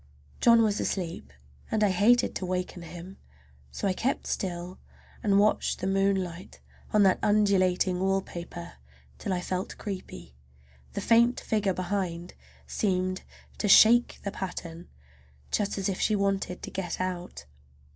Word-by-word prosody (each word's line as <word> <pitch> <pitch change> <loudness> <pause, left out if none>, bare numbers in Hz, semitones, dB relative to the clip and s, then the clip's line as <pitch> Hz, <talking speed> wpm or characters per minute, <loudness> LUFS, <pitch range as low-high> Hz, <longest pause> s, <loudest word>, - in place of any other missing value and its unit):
John 230 -1 +6
was 210 -2 +1
asleep 165 - -3 0.4
and 215 -1 +1
I 205 - +4
hated 215 +7 +3
to 185 - -4
waken 180 0 -3
him, 175 +3 -10 0.5
so 200 - -3
I 190 - +1
kept 255 +8 -1
still 180 -1 -4 0.4
and 200 -2 +3
watched 210 +1 +2
the 185 - -5
moonlight 195 -2 -1 0.3
on 210 -1 +4
that 190 -1 +4
undulating 190 -3 +2
wallpaper 175 - -3 0.4
till - - -3
I 180 -1 0
felt 185 +1 -4
creepy. 190 - -7 0.6
The - - -3
faint 235 +1 +4
figure 205 -4 0
behind 180 -2 -3 0.3
seemed 185 -2 -1 0.4
to 210 - 0
shake 235 +4 +6
the 200 - -3
pattern, 175 -3 -6 0.6
just 205 -1 0
as 195 - -1
if 190 -2 -2
she 215 - +2
wanted 195 -2 -1
to - - -6
get 180 -3 -4
out. 185 - -4
190 Hz, 140 wpm, -28 LUFS, 180-205 Hz, 0.6 s, John